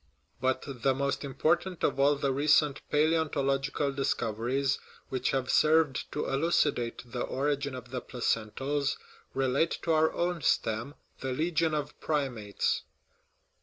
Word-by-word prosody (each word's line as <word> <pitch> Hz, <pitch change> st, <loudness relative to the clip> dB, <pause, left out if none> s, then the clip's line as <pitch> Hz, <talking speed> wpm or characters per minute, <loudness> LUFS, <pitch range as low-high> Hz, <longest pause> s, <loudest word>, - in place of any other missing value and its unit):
But 130 Hz, +1 st, 0 dB
the 135 Hz, -1 st, 0 dB
most 140 Hz, +2 st, -1 dB
important 170 Hz, +6 st, 0 dB
of -, -, +1 dB
all 145 Hz, +1 st, +5 dB
the 140 Hz, -1 st, 0 dB
recent 145 Hz, 0 st, +3 dB
palaeonto 155 Hz, 0 st, +2 dB
logical 135 Hz, +1 st, 0 dB
discoveries 130 Hz, 0 st, 0 dB, 0.3 s
which 130 Hz, -1 st, -1 dB
have 130 Hz, -1 st, 0 dB
served 155 Hz, -4 st, +3 dB
to 150 Hz, -, -1 dB
elucidate 135 Hz, -5 st, +1 dB
the 125 Hz, -, -3 dB
origin 140 Hz, 0 st, -1 dB
of 125 Hz, -1 st, -9 dB
the 125 Hz, -1 st, -3 dB
placentals 135 Hz, +4 st, -1 dB, 0.4 s
relate 135 Hz, +4 st, +1 dB
to 165 Hz, -, +1 dB
our 160 Hz, 0 st, +4 dB
own 175 Hz, -1 st, -1 dB
stem, 115 Hz, +3 st, 0 dB, 0.2 s
the 130 Hz, -1 st, -2 dB
legion 160 Hz, +2 st, +1 dB
of 150 Hz, -1 st, -4 dB
primates. 125 Hz, -9 st, -1 dB
140 Hz, 130 wpm, -29 LUFS, 130-150 Hz, 0.4 s, all